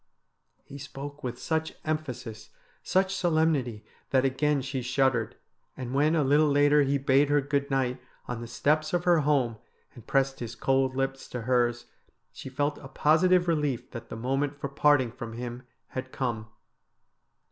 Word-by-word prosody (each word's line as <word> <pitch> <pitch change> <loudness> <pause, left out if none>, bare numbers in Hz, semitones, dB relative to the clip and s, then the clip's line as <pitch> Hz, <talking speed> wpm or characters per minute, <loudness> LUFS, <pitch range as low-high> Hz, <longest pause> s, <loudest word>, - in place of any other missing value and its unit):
He 140 - -11
spoke 140 +2 -8
with 125 -1 -4
such 160 +3 -2
emphasis, 125 -8 -4 0.3
such 190 +1 +1
solemnity, 155 - +1 0.2
that 130 -1 +3
again 140 +1 +1
she 130 0 -3
shuddered, 125 -2 +1 0.4
and 130 -1 -5
when 150 +4 +3
a 155 - +3
little 145 +3 +4
later 145 +1 +4
he 140 0 +2
bade 140 +1 +3
her 145 0 +4
good 140 0 -1
night 130 -2 0 0.3
on 120 -1 -4
the 120 - -6
steps 155 +6 0
of 175 0 +1
her 175 -2 +4
home, 140 -6 +1 0.4
and 120 - -14
pressed 135 0 +1
his 120 -1 -6
cold 135 -1 +1
lips 135 0 -2
to 125 - -5
hers 120 0 +1 0.5
she - - -8
felt 145 +2 -1
a 135 - -10
positive 175 +6 +3
relief 150 -7 -1
that 115 - -8
the - - -6
moment 135 +4 -1
for 140 - -4
parting 140 -3 +3
from 120 -2 -7
him 120 +1 -7 0.2
had 130 0 -6
come. 115 -5 -3
135 Hz, 165 wpm, -28 LUFS, 125-150 Hz, 0.5 s, little